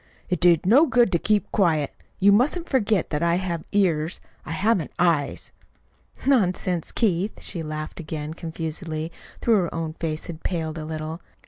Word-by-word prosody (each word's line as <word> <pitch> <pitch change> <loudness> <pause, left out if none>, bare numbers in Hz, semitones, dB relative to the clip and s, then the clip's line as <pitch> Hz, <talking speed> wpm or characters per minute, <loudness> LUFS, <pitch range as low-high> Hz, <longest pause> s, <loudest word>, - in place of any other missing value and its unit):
"It 180 -3 0
did 175 -2 +4
no 270 - +6
good 240 -6 +4
to 170 - +2
keep 210 +2 +1
quiet. 160 -8 +2 0.2
You 200 +1 +5
mustn't 290 - +2
forget 215 - +1
that 150 0 -1
I 170 0 +3
have 175 -3 -2
ears 170 -5 +1
if - - -25
I - - -5
haven't 190 -1 +1
eyes." 165 -5 +1 0.7
"Nonsense, 185 - +1
Keith!" 200 -2 0
She 175 - -3
laughed 155 +1 -5
again 155 -1 -5
confusedly, 160 -1 -4 0.3
though 235 - +1
her 190 -6 +3
own 165 -1 -3
face 160 -1 -4
had 165 -2 -8
paled 160 -3 -3
a 155 - -5
little. 160 +1 -5
170 Hz, 165 wpm, -24 LUFS, 160-200 Hz, 0.7 s, no